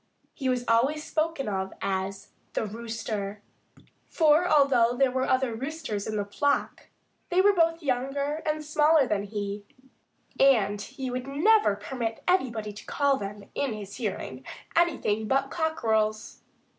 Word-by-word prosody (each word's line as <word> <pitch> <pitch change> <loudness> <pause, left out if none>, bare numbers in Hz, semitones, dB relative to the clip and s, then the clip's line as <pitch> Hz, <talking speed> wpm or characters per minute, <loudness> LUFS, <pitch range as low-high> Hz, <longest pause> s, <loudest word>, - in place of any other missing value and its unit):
He 265 -3 -2
was 250 -1 0
always 265 +7 +2
spoken 315 -4 -1
of 190 -2 -2
as 195 0 -3 0.2
"the - - -1
Rooster." 215 -2 -5 0.7
For 320 +2 +4
although 265 -6 +4
there 270 -1 +3
were 260 +1 -1
other 260 -2 +2
roosters 265 -4 -4
in 215 - -3
the 205 -1 -1
flock, 285 +8 -1 0.4
they 360 - +2
were 405 +2 +6
both 330 -2 +2
younger 280 +3 -1
and 305 0 -2
smaller 300 0 +4
than 205 -2 -1
he, 205 0 -4 0.8
and 210 -7 +4
he 260 +3 -6
would 250 +1 -4
never 325 - +3
permit 225 +2 -4
anybody 235 - 0
to 210 - -11
call 280 -1 +2
them 200 -1 -6
in 275 -5 -1
his 205 -2 -8
hearing 190 - -4 0.3
anything 260 -11 +1
but 270 +2 +1
cockerels. 220 -10 -1
255 Hz, 145 wpm, -27 LUFS, 210-295 Hz, 0.8 s, were